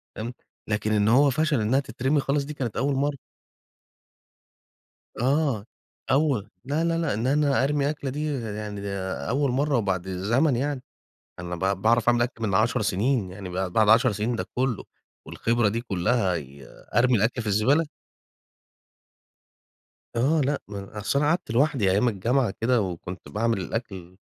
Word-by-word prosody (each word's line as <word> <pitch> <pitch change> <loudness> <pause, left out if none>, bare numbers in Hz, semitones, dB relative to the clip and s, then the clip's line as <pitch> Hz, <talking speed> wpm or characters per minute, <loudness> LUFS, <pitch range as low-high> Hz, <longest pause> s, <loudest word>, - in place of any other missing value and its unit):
تمام، 115 +3 -5 0.3
لكن 105 0 -1
إن 105 0 +2
هو 140 +5 +5
فشل 150 -2 +1
إنها 115 +6 +2
تترمي 135 +3 0
خالص 140 +1 0
دي 150 - -6
كانت 125 -7 -4
أول 135 +4 +1
مرّه. 140 +1 0 2.0
آه، 135 -4 +1 0.5
أول 130 -7 +1
لا، 145 +5 0
لا، 165 0 +1
لأ 165 -9 0
إن 110 +4 -1
أنا 140 0 +2
أرمي 145 0 +1
أكلة 145 -3 -4
دي 150 +2 -2
يعني 105 -2 -5 0.5
أول 140 +2 +1
مرّه، 140 +3 +1
وبعد 95 -5 -1
زمن 115 - +1
يعني 140 0 -2 0.6
أنا 90 0 -5
ب 95 +2 -1
باعرف 115 +1 +3
أعمل 120 0 +4
أكل 120 -2 -4
من 95 - -1
10 - - +2
سنين، 110 0 0
يعني 95 0 -8
بعد 90 0 -3
بعد 110 +2 +3
10 115 +2 +5
سنين 110 +4 -1
ده - - -3
كُلُّه، 125 -3 -1 0.4
والخبرة 115 -1 +1
دي 115 +3 -2
كُلَّها 100 -2 0
ي 70 -2 -9 0.3
أرمي 120 +2 +4
الأكل 115 +4 +1
في - - -9
الزبالة؟ 120 +11 +3 2.3
آه، 145 +7 +3
لأ 145 +1 0
ما 100 -1 -6
أنا 100 +2 -9
أصل 105 +6 0
أنا 145 +1 +2
قعدت 170 -2 0
لوحدي 125 -4 +2
أيام 105 +6 +3
الجامعة 115 +2 0
كده، 120 +1 +3
وكنت 90 -1 -5
باعمل 115 0 0
الأكل 95 -3 -5
120 Hz, 160 wpm, -25 LUFS, 105-140 Hz, 2.3 s, هو